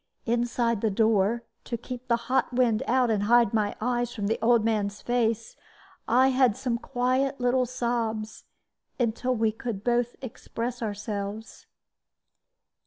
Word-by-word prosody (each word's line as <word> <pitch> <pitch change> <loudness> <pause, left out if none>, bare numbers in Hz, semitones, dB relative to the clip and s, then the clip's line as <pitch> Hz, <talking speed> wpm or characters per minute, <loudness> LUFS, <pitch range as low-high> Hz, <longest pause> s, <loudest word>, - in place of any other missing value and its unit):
Inside 235 -1 0
the 220 - +2
door, 220 +2 +2 0.2
to 235 - -3
keep 250 +2 -8
the 235 - +3
hot 260 -1 +1
wind 240 -3 +2
out 250 -1 +3
and 210 -2 +1
hide 235 -1 +4
my 210 -2 0
eyes 240 +1 -1
from 205 - -3
the 220 +3 0
old 230 -1 +4
man's 210 -2 0
face, 230 -2 -1 0.5
I 255 +3 +5
had 255 -4 +3
some 255 -2 -2
little - - -16
quiet 260 +2 +1 0.3
sobs, 230 -3 -2 0.5
until 245 +2 0
we 220 -1 +2
could 220 -3 -5
both 240 0 +1
express 240 0 -5
ourselves. 210 0 -5
235 Hz, 140 wpm, -27 LUFS, 220-245 Hz, 0.5 s, I